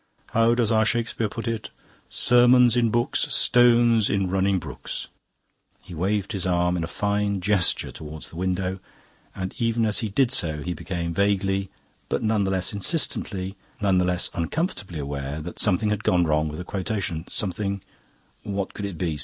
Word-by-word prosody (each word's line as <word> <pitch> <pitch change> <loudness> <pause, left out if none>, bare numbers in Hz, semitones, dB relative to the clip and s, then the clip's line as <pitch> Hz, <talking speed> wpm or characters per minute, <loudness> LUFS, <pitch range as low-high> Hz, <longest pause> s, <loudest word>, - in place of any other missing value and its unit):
How 115 +1 +3
does 120 -2 +1
our 110 -1 +4
Shakespeare 115 0 0
put 115 +2 -6
it? 115 -2 -3 0.4
'Sermons 125 -1 +5
in 120 -2 +3
books, 120 +2 0
stones 120 -2 +4
in 100 -1 +1
the 95 - -2
running 95 +1 +2
brooks.'" - - -6 0.7
He 90 - -12
waved 100 +4 -1
his 95 -4 -2
arm 90 0 +1
in 85 - -1
a - - -3
fine 105 0 -1
gesture 95 -1 +1
towards 80 0 -8
the - - -13
window, 95 +1 -2 0.6
and 95 0 -4
even 115 -1 +1
as 105 -1 +1
he 110 - -2
did 125 +4 +2
so 80 - 0
he 90 - -2
became 85 -2 -4
vaguely, 100 0 +1 0.4
but - - -1
none 110 -2 +1
the - - 0
less 95 0 0
insistently, 100 - -1 0.2
none 95 -3 +2
the 90 - +2
less 90 0 +1
uncomfortably 95 - -2
aware 70 0 -4
that 85 +3 -8
something 105 +1 +2
had 105 - -2
gone 90 -1 +3
wrong 75 0 +1
with 75 0 -6
the 90 - -5
quotation. 95 -4 -3
Something 100 0 -2 0.6
what 100 -1 -4
could 105 - -5
it 100 -4 -5
be? 80 -4 -2
100 Hz, 180 wpm, -24 LUFS, 90-110 Hz, 0.7 s, Sermons